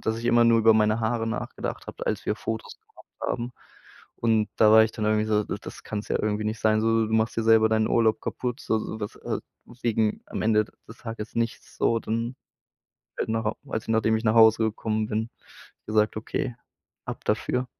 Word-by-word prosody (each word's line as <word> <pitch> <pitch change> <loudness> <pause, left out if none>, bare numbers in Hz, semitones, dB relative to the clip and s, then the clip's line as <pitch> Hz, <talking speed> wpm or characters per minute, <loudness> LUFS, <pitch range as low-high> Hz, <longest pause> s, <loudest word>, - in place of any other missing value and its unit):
dass 110 0 -1
ich 115 - -7
immer 120 0 +4
nur 115 0 +5
über 110 0 +6
meine 110 0 +3
Haare 115 0 0
nachgedacht 110 - -4
habe, - - -7
als - - -1
wir - - 0
Fotos 110 0 -5
gemacht - - -21 0.2
haben. 120 +1 -3 0.6
Und 110 -2 +2
da 110 - +6
war 110 0 +9
ich 110 - -4
dann 110 - -4
irgendwie 110 0 +2
so: 105 -1 +1
„D - - -4
das - - -10
kann's 105 -1 -5
ja - - +1
irgendwie 105 0 -1
nicht 110 +1 -2
sein, 110 0 +3
so, 115 0 +2
du 110 - -5
machst 110 +1 +1
dir 115 - +1
selber 110 0 +5
deinen 110 0 +2
Urlaub 110 -2 +2
kaputt. 125 +2 -3
S - - -13
so 110 - +2
sowas, 110 -1 -5
äh - - -4 0.4
wegen 110 -2 +1
am - - -4
Ende 110 -1 +3 0.2
des 115 - -12
Tages 115 -2 -7
nichts 115 0 -3
so 115 - +2
dann“, 115 +3 -2 0.8
äh - - -1
genau 110 -1 -1
als 110 - -2
ich - - -13
nachdem 110 0 +2
ich 110 - -5
nach 110 0 +2
Hause 110 0 +6
gekommen 110 0 -1
bin, 110 +1 -2 0.6
gesagt: 110 0 +2
„Okay, 120 +3 -3 0.5
ab - - -7
dafür.“ 125 0 0
110 Hz, 210 wpm, -26 LUFS, 110-115 Hz, 0.8 s, war